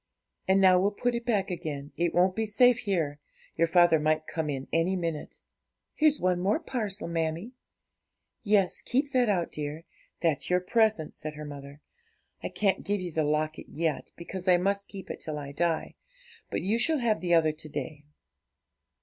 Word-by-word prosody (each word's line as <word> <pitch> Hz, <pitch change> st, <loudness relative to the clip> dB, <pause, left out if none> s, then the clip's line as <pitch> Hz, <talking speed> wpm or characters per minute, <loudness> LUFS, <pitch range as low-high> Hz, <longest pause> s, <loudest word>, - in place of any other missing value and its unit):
And 190 Hz, +1 st, +4 dB
now 185 Hz, -1 st, +6 dB
we'll 195 Hz, +2 st, +3 dB
put 245 Hz, +4 st, -1 dB
it 235 Hz, 0 st, -3 dB
back 205 Hz, -5 st, +1 dB
again, 150 Hz, -5 st, -5 dB
it 170 Hz, 0 st, +1 dB
won't 185 Hz, +1 st, +3 dB
be 220 Hz, 0 st, -1 dB
safe 245 Hz, +3 st, +5 dB
here; 165 Hz, -9 st, -1 dB, 0.4 s
your 165 Hz, -, +3 dB
father 175 Hz, -1 st, +5 dB
might 155 Hz, +1 st, +1 dB
come 160 Hz, -2 st, -3 dB
in 135 Hz, -2 st, -4 dB
any 165 Hz, +3 st, +2 dB
minute.' 165 Hz, -4 st, -4 dB, 0.6 s
'Here's 305 Hz, -1 st, +3 dB
one 180 Hz, -1 st, +1 dB
more 195 Hz, -, +1 dB
parcel, 215 Hz, -, -3 dB
mammie.' 165 Hz, +5 st, -2 dB, 0.9 s
'Yes, 200 Hz, -3 st, +2 dB
keep 275 Hz, +3 st, 0 dB
that 250 Hz, -3 st, +3 dB
out, 180 Hz, -4 st, 0 dB
dear; 150 Hz, +2 st, -5 dB, 0.4 s
that's 160 Hz, -5 st, 0 dB
your 180 Hz, 0 st, +3 dB
present,' 215 Hz, -4 st, +1 dB
said 155 Hz, 0 st, -7 dB
her 150 Hz, 0 st, -7 dB
mother. 140 Hz, 0 st, -9 dB, 0.6 s
'I -, -, -3 dB
can't 200 Hz, -2 st, 0 dB
give 205 Hz, 0 st, -1 dB
you 180 Hz, -2 st, -5 dB
the 155 Hz, 0 st, 0 dB
locket 155 Hz, +1 st, -1 dB
yet, 160 Hz, -1 st, -2 dB
because 185 Hz, +2 st, -7 dB
I 180 Hz, -1 st, +6 dB
must 200 Hz, +2 st, 0 dB
keep 195 Hz, -2 st, -8 dB
it -, -, -7 dB
till 155 Hz, -1 st, -5 dB
I 140 Hz, -1 st, -6 dB
die; 165 Hz, +2 st, -1 dB, 0.6 s
but -, -, -2 dB
you 215 Hz, +5 st, +1 dB
shall 315 Hz, +5 st, +2 dB
have 230 Hz, -5 st, +1 dB
the 175 Hz, -1 st, +3 dB
other 160 Hz, -2 st, +4 dB
to 155 Hz, 0 st, -10 dB
day.' 150 Hz, 0 st, -6 dB
175 Hz, 185 wpm, -28 LUFS, 155-205 Hz, 0.9 s, now